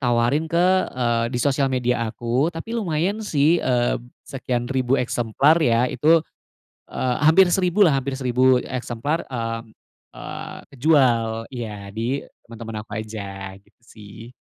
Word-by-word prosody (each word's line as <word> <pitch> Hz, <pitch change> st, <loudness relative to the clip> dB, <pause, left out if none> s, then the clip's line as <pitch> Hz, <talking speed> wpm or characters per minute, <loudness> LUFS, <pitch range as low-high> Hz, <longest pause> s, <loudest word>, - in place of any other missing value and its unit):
tawarin 120 Hz, +5 st, +1 dB
ke, 170 Hz, -, -2 dB, 0.3 s
eee, 120 Hz, -2 st, 0 dB
di 125 Hz, -, -4 dB
sosial 135 Hz, +2 st, +1 dB
media 125 Hz, -3 st, 0 dB
aku, 120 Hz, +6 st, -1 dB
tapi 175 Hz, +7 st, -7 dB
lumayan 195 Hz, -1 st, -1 dB
sih, 165 Hz, -4 st, +2 dB
eee, 120 Hz, -2 st, +1 dB, 0.2 s
sekian 125 Hz, -2 st, -3 dB
ribu 130 Hz, 0 st, 0 dB
eksemplar 125 Hz, +7 st, +2 dB
ya 120 Hz, -5 st, +3 dB
itu, 155 Hz, +6 st, +3 dB, 0.7 s
eee, 125 Hz, -1 st, -1 dB
hampir 165 Hz, +5 st, +6 dB
1000 190 Hz, +2 st, +3 dB
lah, 155 Hz, -, +3 dB
hampir 130 Hz, 0 st, -4 dB
1000 130 Hz, 0 st, +3 dB
eksemplar, 130 Hz, +6 st, -3 dB
eee 115 Hz, -2 st, -3 dB, 0.6 s
eee, -, -, -7 dB, 0.2 s
kejual, 120 Hz, -6 st, +2 dB
iya 105 Hz, -4 st, -7 dB
di 120 Hz, +5 st, -2 dB, 0.2 s
teman 115 Hz, -1 st, -13 dB
teman 115 Hz, -1 st, -7 dB
aku 105 Hz, -, -24 dB
aja 100 Hz, -3 st, -7 dB
gitu -, -, -33 dB
sih. 110 Hz, +3 st, -13 dB
125 Hz, 140 wpm, -22 LUFS, 115-150 Hz, 0.7 s, hampir